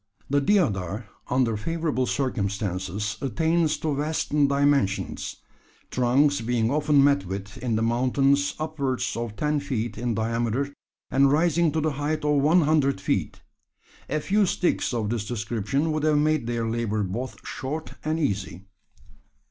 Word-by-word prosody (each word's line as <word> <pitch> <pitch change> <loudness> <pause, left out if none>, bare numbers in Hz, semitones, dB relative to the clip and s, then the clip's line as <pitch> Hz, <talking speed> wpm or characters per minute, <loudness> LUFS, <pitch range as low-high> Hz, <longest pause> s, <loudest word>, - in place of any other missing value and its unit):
The 145 0 +3
deodar, 110 - +1 0.2
under 125 -3 +2
favourable 155 +1 -1
circumstances, 100 - -2
attains 160 +5 +1
to 155 -2 -1
vast 150 +3 -1
dimensions, 140 -7 +1 0.6
trunks 130 +3 +3
being 115 0 0
often 150 -1 +4
met 140 -10 +3
with 100 +5 -6
in 120 -2 -1
the 110 - +1
mountains 135 +4 +2
upwards 150 -5 -2
of 115 -2 -4
ten 150 +4 0
feet 120 -6 -3
in 120 -2 -1
diameter, 115 +5 -1 0.4
and 135 0 +4
rising 165 +1 +3
to 160 - +1
the 155 0 +1
height 150 +1 -1
of 150 -1 +3
one 160 +5 +5
hundred 145 -6 +2
feet. 95 - -2 0.7
A 155 - 0
few 200 +5 +2
sticks 175 - 0
of 115 -3 -1
this 115 -3 -1
description 120 +6 -1
would 155 0 -1
have 155 0 +3
made 150 -4 +1
their 120 -1 -1
labour 110 -2 -1
both 115 +8 -4
short 150 +4 -5
and 155 +1 -1
easy. 100 - -2
135 Hz, 145 wpm, -25 LUFS, 115-150 Hz, 0.7 s, one